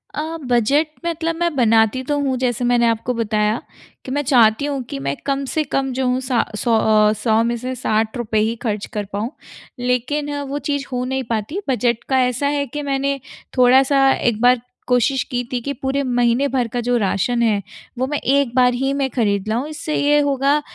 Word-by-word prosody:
अ, 320 +2 -3
budget 250 +6 +2 0.2
मतलब 330 0 -1
मैं 340 -3 0
बनाती 225 0 +3
तो 290 +2 -1
हूँ 265 -2 0
जैसे 245 -1 -1
मैंने 240 -1 +3
आपको 230 +2 0
बताया, 215 -1 0 0.4
कि 260 - -6
मैं 290 +1 0
चाहती 240 -1 +4
हूँ 280 -2 -2
कि 135 - -5
मैं 140 +1 -2
कम 275 0 0
से 310 +3 -1
कम 270 -1 -1
जो 260 0 -1
हूँ 250 +1 +1
सा 250 -2 +1 0.2
सौ 230 -1 +2
अ, 215 -1 +4
100 220 +1 +1
में 235 +1 0
से 255 +2 -4
₹60 220 -1 -1
ही 220 +2 +1
ख़र्च 210 -3 -2
कर 210 -1 -2
पाऊँ। 220 +6 -2 0.5
लेकिन 255 +4 -1 0.2
वो 290 +1 -2
चीज़ 285 -1 -1
हो 250 0 -1
नहीं 265 0 -2
पाती 230 - -2
बजट 240 -2 0
का 265 -1 +3
ऐसा 250 +3 -1
है 285 0 0
कि 295 +4 -5
मैंने 275 0 -1 0.4
थोड़ा-सा 270 +2 +5
एक 230 -2 -1
बार 245 -1 +4 0.3
कोशिश 250 +2 +2
की 245 0 -1
थी 250 - -1
कि 280 +3 -3
पूरे 270 +1 -2
महीने 245 +1 +2
भर 250 -3 0
का 245 +2 -4
जो 245 +1 0
राशन 230 +3 0
है, 210 -3 +2 0.4
वो 255 - 0
मैं 295 0 -1
एक 275 -2 +1
बार 250 -1 +4
ही 270 +2 -1
मैं 275 -1 0
ख़रीद 205 -5 0
लाऊँ, 235 +7 -1
इससे 310 0 -4
ये 295 +1 +3
होगा 285 +1 +2
250 Hz, 200 wpm, -20 LUFS, 230-275 Hz, 0.5 s, थोड़ा-सा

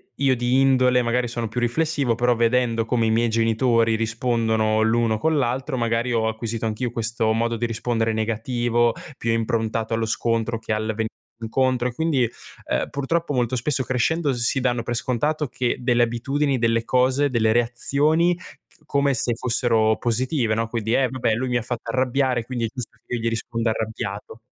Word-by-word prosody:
io 135 -2 +2
di 125 +2 +1
indole 130 -2 +4
magari 120 +1 0
sono 115 -1 -3
più 115 +3 -3
riflessivo, 140 0 0
però 120 +1 +2
vedendo 115 -1 +1
come 115 -1 +1
i - - +2
miei 115 +1 +2
genitori 115 0 +2
rispondono 110 -1 0
l'uno 110 0 +2
con 160 +5 +1
l'altro, 130 +1 -1
magari 115 +1 0
ho 115 -2 +1
acquisito 110 0 -3
anch'io 115 +2 -2
questo 115 -1 0
modo 115 +1 0
di 120 +1 -2
rispondere 115 -1 -1
negativo, 120 +1 0 0.2
più 115 - -1
improntato 115 0 -1
allo 115 0 0
scontro 115 0 -1
che 110 -1 -3
al 110 0 -2
venir 110 0 -1 0.3
incontro. 125 +2 +1
E 125 - -4
quindi, 155 -2 +1 0.5
ehm, - - 0
purtroppo 145 +3 -1
molto 125 0 0
spesso 130 +2 0
crescendo 140 +4 0
si 120 +2 0
danno 125 -2 0
per 120 - -3
scontato 145 +6 -1
che 125 0 -1
delle 120 -1 +2
abitudini, 135 +4 0
delle 115 0 +1
cose, 130 +3 +2
delle 110 -3 +2
reazioni 145 +8 +2
c 175 - -15 0.3
come 140 -1 +1
se 120 -1 -1
fossero 115 -2 +1
positive, 120 -1 0
no, 115 0 -1
quindi: 115 0 -1
"Eh, 135 - +3
vabbè, 125 -3 -1
lui 130 +3 -2
mi 125 - +1
ha - - -1
fatto 120 +1 -5
arrabbiare 130 -1 +1
quindi 120 -2 -2
è - - 0
giusto 125 -4 -7
che - - -7
io 120 - -2
gli 115 - -1
risponda 115 0 -2
arrabbiato." 110 -1 -4
120 Hz, 180 wpm, -23 LUFS, 115-130 Hz, 0.5 s, indole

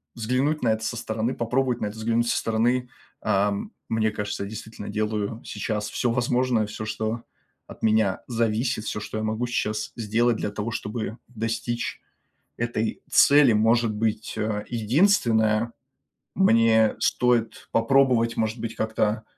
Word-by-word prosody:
взглянуть 130 +6 0
на 120 - +3
это 110 0 0
со 120 - -2
стороны, 110 +3 -2
попробовать 125 +1 0
на 105 - 0
это 105 - -7
взглянуть 115 +1 +1
со - - +1
стороны, 120 +3 +1 0.3
э, 100 +1 +2 0.4
мне 110 -1 +1
кажется, 105 -1 -4
я 100 - -5
действительно 110 0 -8
делаю 110 +1 -2
сейчас 105 -2 -3
всё 120 - 0
возможное, 125 -1 +1
всё, 105 +1 -6
что 110 +1 -3 0.4
от - - -13
меня 110 -3 +2
зависит, 115 0 0
всё, - - -3
что 110 - -6
я 110 - -2
могу 110 +2 -1
сейчас 105 -3 -2
сделать 115 +1 +1
для - - -2
того, 105 +2 -4
чтобы 110 0 -4
достичь 115 0 -3 0.6
этой 115 -2 -2
цели. 140 -3 +6
Может 110 +1 +3
быть, 110 +1 -2
э, 105 -1 -1
единственное, 115 - +2 0.6
мне 115 - +4
стоит 120 -2 +1
попробовать, 115 -1 +3
может 110 +1 -1
быть, 115 0 -5
как-то, 110 0 0
115 Hz, 145 wpm, -25 LUFS, 110-120 Hz, 0.6 s, цели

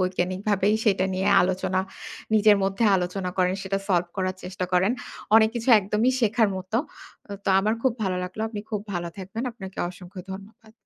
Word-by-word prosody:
বৈজ্ঞানিকভাবেই 185 +3 +1
সেটা 195 -3 +3
নিয়ে 190 +1 0
আলোচনা 185 0 0 0.5
নিজের 210 -1 +6
মধ্যে 195 +4 0
আলোচনা 180 +1 -2
করেন। 180 0 +2
সেটা 195 0 -1
সলভ 175 -2 +2
করার 185 -1 -1
চেষ্টা 185 0 -4
করেন। 185 +5 +3 0.4
অনেক 220 -1 +6
কিছু 235 +1 -4
একদমই 210 +5 +1
শেখার 225 -1 +3
মতো। 185 +4 -3 0.7
তো - - -1
আমার 215 +3 +1
খুব 260 - +3
ভালো 185 -1 -1
লাগলো। 185 +4 -7
আপনি 210 -2 -5
খুব 210 - -1
ভালো 170 0 -2
থাকবেন। 195 +5 -5
আপনাকে 190 -5 -10
অসংখ্য 180 +1 -11
ধন্যবাদ। 215 +3 -12
190 Hz, 165 wpm, -25 LUFS, 185-215 Hz, 0.7 s, নিজের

